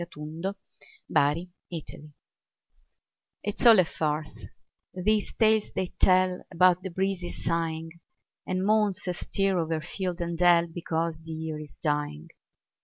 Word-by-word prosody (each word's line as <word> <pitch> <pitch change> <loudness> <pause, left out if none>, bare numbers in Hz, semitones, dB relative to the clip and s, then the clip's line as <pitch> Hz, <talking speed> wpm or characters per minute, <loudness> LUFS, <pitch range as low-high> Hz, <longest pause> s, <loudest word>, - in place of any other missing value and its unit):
MERRY 160 +5 +2 0.2
AUTUMN 150 -2 -8 1.3
It's 205 0 -3
all 225 -2 +9
a 185 - +5
farce, 155 -1 -3 0.5
these 210 +3 +1
tales 220 -1 +3
they 185 - -2
tell 185 0 +4
About 180 +1 +4
the 190 - -5
breezes 185 0 -3
sighing, 165 -1 -1 0.6
And 185 +1 -1
moans 210 -3 +2
astir 190 +1 0
o'er 160 -1 -1
field 180 +2 -4
and 170 -1 -3
dell, 175 -1 +6
Because 165 -1 -3
the 165 0 -14
year 160 -1 -4
is 150 -1 -11
dying. 145 - -2
175 Hz, 120 wpm, -27 LUFS, 160-185 Hz, 1.3 s, all